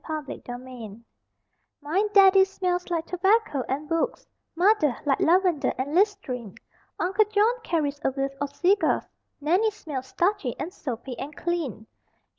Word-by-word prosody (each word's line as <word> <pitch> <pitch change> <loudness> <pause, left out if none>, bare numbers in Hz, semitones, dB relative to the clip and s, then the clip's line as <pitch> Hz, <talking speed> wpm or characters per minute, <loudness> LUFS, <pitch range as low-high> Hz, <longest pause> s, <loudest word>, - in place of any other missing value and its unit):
_ 310 -2 -4
SMELLS - - -8
(JUNIOR) 245 -4 -8 0.8
My 315 +7 0
Daddy 390 -1 +7
smells 365 -2 -2
like 335 -2 -1
tobacco 380 - +1
and 285 +3 -2
books, 330 0 -1 0.3
Mother, 345 - +3
like 275 -2 +2
lavender 355 -3 +2
and 275 +3 -3
listerine; 325 - 0 0.4
Uncle 395 +4 +2
John 420 +3 +3
carries 295 -7 -1
a - - +3
whiff 270 +1 -3
of 285 0 -3
cigars, 385 +3 +2 0.4
Nannie 360 +9 +2
smells 295 -11 -6
starchy 345 - 0
and 360 - -4
soapy 250 - -6
and 295 +2 -6
clean. 325 - -3
325 Hz, 140 wpm, -26 LUFS, 275-385 Hz, 0.8 s, Daddy